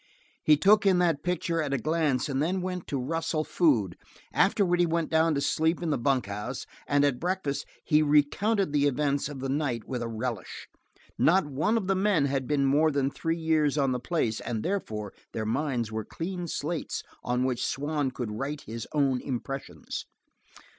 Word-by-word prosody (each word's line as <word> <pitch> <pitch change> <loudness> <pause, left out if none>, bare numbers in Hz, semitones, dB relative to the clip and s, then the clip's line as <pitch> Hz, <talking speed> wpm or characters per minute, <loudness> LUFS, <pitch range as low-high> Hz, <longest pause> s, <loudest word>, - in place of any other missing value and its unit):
He 150 -1 +6
took 205 +6 +5
in 190 -2 +5
that 165 -5 +2
picture 170 -1 -1
at 140 -2 -1
a - - +1
glance 155 -1 +1
and 135 -1 -1
then 180 +4 0
went 180 -1 -4
to 140 - -2
rustle 160 +3 -1
food; 120 - +2 0.4
afterward 175 -3 +3
he 175 - +5
went 165 -1 -1
down 160 0 +3
to 140 - 0
sleep 160 +3 +1
in 165 - 0
the - - +1
bunkhouse 120 -2 -1 0.2
and 145 0 +3
at 140 -4 +1
breakfast 175 -5 -2 0.2
he 155 -1 +4
recounted 155 +6 +2
the 145 -1 +3
events 140 +1 0
of 140 -3 -7
the 135 - -2
night 135 -5 -1
with 125 -2 -3
a 120 - -2
relish. 115 -3 -5 0.5
Not 185 +1 +4
one 155 - +1
of 215 - -1
the 195 - +2
men 190 -6 +2
had 135 -2 -1
been 145 -2 +2
more 145 +4 +4
than 140 -2 0
three 165 +3 -2
years 155 -3 +2
on 135 -2 +2
the 125 - -1
place, 125 -6 -1
and 110 -2 -3
therefore 110 - -3 0.2
their 110 - -2
minds 120 -1 -1
were 110 0 -3
clean 175 - -5
slates 160 +1 -3 0.2
on 125 +1 0
which 125 -2 0
Swann 145 0 -1
could 120 -4 -5
write 140 +7 -4
his 115 0 -7
own 135 -4 +2
impressions. 130 - -5
145 Hz, 190 wpm, -28 LUFS, 130-165 Hz, 0.5 s, He